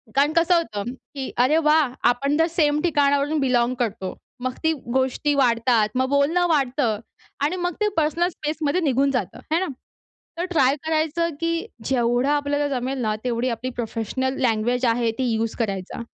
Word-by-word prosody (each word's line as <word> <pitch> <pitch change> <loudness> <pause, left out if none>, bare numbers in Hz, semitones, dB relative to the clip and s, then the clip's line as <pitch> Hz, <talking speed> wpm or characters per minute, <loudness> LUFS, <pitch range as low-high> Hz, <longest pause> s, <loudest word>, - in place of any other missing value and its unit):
कारण 285 +3 +3
कसं 335 +2 +4
होतं, 230 -7 -2
की 265 0 -8
अरे 305 +4 +3
वाह! 300 -5 +3 0.2
आपण 280 +4 -1
तर 325 - +4
सेम 295 0 +3
ठिकाणावरून 290 -2 +2
बिलॉंग 250 -2 +2
करतो. 200 -5 -2 0.3
मग 255 -1 -1
ती 320 0 +3 0.3
गोष्टी 265 +3 0
वाढतात, 230 -4 +3
मग 260 +1 +1
बोलणं 300 +6 +2
वाढतं 265 -8 +1 0.4
आणि 305 +5 +1
मग 355 - -1
ते 420 - +3
पर्सनल 325 +3 +2
स्पेसमध्ये 305 +2 -1
निघून 275 +2 +2
जातं. - - -5
है 335 - +3
ना. 375 - -1 0.7
तर 350 - 0
ट्राय 280 -7 +3
करायचं 320 +1 0
की 335 0 0 0.3
जेवढं 245 +1 +1
आपल्याला 290 0 +1
जमेल 265 0 -2
ना 215 -1 0
तेवढी 245 0 0
आपली 245 +2 -3
प्रोफेशनल 240 +3 -2
लैंग्वेज 245 +1 +1
आहे 230 0 +2
ती 260 - -1
यूज 225 0 -1
करायचा. 195 -1 -3
270 Hz, 165 wpm, -23 LUFS, 240-305 Hz, 0.7 s, कसं